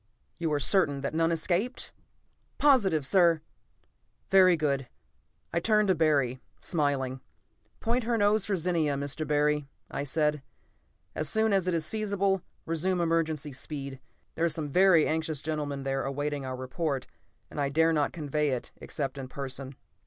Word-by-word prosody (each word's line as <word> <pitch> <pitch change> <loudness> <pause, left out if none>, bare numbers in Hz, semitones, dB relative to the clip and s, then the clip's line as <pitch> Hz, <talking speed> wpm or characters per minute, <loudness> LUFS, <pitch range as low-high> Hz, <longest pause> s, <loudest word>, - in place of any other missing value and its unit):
"You 165 -2 -1
are 145 - +1
certain 145 -4 +3
that 140 - -3
none 165 +1 +2
escaped?" 180 +9 -1 0.6
"Positive, 200 - +4
sir." 170 -1 +4 0.9
"Very 185 -2 +6
good." 140 -4 0 0.7
I 170 - +2
turned 215 +2 +3
to - - +6
Barry, 145 -6 +2 0.2
smiling. 135 -5 -1 0.6
"Point 235 +1 0
her 235 0 +1
nose 205 -1 +3
for 200 - 0
Zenia, 165 -4 0
Mr. 140 +2 -3
Barry," 150 -1 +1 0.2
I - - -2
said. 150 +1 0 0.7
"As 155 -1 -1
soon 220 -1 +2
as 190 -2 +2
it 180 - +1
is 155 -1 -1
feasible, 200 -3 0 0.2
resume 175 +3 0
emergency 160 -3 0
speed. 140 0 -6 0.3
There 165 - 0
are - - +2
some 155 -2 -2
very 180 0 +5
anxious 160 -2 -1
gentlemen 145 -2 -3
there 135 0 -1
awaiting 145 0 -2
our 130 - -3
report, 130 +1 -3 0.5
and 145 - -3
I 140 - +1
dare 160 +3 +3
not 150 -2 +1
convey 150 -1 -1
it 125 -3 -3
except 135 0 -4
in 130 - -5
person." 135 0 -6
155 Hz, 155 wpm, -29 LUFS, 140-180 Hz, 0.9 s, Very